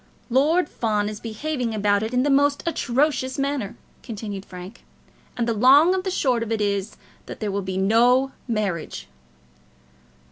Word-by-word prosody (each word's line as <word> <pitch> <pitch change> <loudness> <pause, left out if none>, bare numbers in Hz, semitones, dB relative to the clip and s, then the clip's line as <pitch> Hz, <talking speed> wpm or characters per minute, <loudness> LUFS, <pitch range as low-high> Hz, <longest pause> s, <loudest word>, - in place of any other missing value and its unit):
"Lord 300 +7 +3
Fawn 210 -6 -1
is 215 0 -7
behaving 235 +1 -3
about 205 -1 +2
it 220 +1 -3
in 250 0 +2
the 290 - +2
most 285 +1 +3
atrocious 270 -3 0
manner," 275 -6 -2 0.3
continued 205 -4 -6
Frank, 180 +5 -10 0.5
"and 235 -1 0
the 230 - +1
long 275 - +6
and 375 -1 -1
the 380 - -2
short 255 -9 +1
of 230 -1 -4
it 225 - 0
is 200 0 -1 0.3
that - - -8
there 210 -2 -2
will 200 +1 -1
be 190 0 -4
no 240 +7 +3 0.2
marriage!" 205 -8 -3
235 Hz, 165 wpm, -23 LUFS, 205-275 Hz, 0.5 s, long